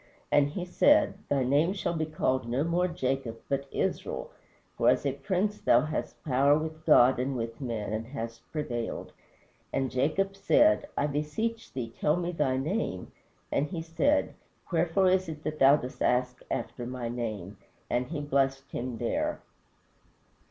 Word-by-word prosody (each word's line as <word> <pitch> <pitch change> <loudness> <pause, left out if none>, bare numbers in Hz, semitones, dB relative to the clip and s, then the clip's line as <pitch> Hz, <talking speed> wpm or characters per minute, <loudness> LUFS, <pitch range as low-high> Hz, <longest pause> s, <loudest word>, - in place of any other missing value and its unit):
And 145 -1 +4
he 175 +4 -4
said, 290 - +4 0.2
Thy 140 -2 +2
name 145 +8 +3
shall 190 -3 -2
be 160 -2 -1
called 130 -6 0
no 130 +4 +1
more 175 +2 +1
Jacob, 135 -8 -2
but 140 0 -1
Israel: - - -2 0.4
for - - +3
as - - +2
a 140 - +2
prince 195 +8 -1
thou 120 - +5
hast 155 +2 -4
power 140 +1 +4
with 155 0 -5
God 130 -4 +6
and 130 +2 -1
with 115 +2 -5
men, 110 -5 -3
and 110 +1 -3
hast 115 -3 -6
prevailed. 120 -7 -4 0.6
And 135 -1 -1
Jacob 160 +10 0
said, 290 +8 +4
I - - +2
beseech 150 +11 -2
thee 115 -3 -5
tell 150 - +3
me 175 0 -2
thy 145 -6 0
name. 135 - -2 0.4
And 145 - +1
he 165 -2 -5
said, 170 - +1 0.4
Wherefore 175 +3 +2
is 185 -1 +2
it 155 -1 -7
that 155 0 -4
thou 135 +2 +7
dost 125 -2 -6
ask 125 0 +1
after 120 -1 -4
my 125 -1 -4
name? 110 -5 -4 0.3
And 125 +1 0
he 150 0 -4
blessed 135 -1 0
him 120 -1 -4
there." 120 +1 -1
140 Hz, 165 wpm, -29 LUFS, 125-165 Hz, 0.6 s, thou